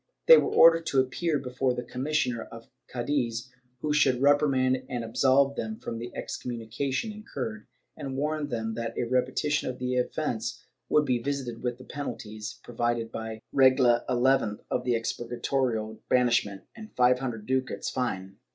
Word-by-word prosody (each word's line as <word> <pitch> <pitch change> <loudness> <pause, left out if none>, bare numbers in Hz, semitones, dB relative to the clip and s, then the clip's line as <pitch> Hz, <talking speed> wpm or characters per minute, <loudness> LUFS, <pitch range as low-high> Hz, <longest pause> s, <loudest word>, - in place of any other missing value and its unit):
They - - +11
were - - 0
ordered 165 0 +6
to 135 - +2
appear 150 +5 0
before 130 -1 -1
the 125 - -4
commissioner 130 -3 -1
of 115 0 -12 0.2
Cddiz, 125 -1 -2 0.3
who 150 -1 0
should 130 -4 +3
reprimand 135 -2 +3
and 120 -3 -3
absolve 135 +4 +3
them 220 +7 -4
from 115 - -6
the 120 +1 -6
excommunication 125 - -3
incurred, 215 +1 -6 0.3
and 135 -3 -5
warn 150 +1 -1
them 110 -4 -3
that 115 0 -4
a - - +1
repetition 130 +4 0
of 125 - -5
the 125 0 -1
offence 120 -3 -2 0.2
would 150 - +4
be 125 -3 +1
visited 135 -4 -3
with 120 -1 -2
the 130 - -12
penalties 110 -6 -6
provided 120 -1 -2
by 110 0 -6
Regla 130 -3 +5
xi 125 -4 +2
of 125 - 0
the 125 - +2
Expur 115 +1 -3
gatorio 115 -4 -1
— - - -49
banishment 120 -6 +2
and 220 -2 -11
five 125 0 +4
hundred 120 -5 -4
ducats 130 +1 -1
fine. 95 -6 -3
125 Hz, 160 wpm, -28 LUFS, 115-140 Hz, 0.3 s, They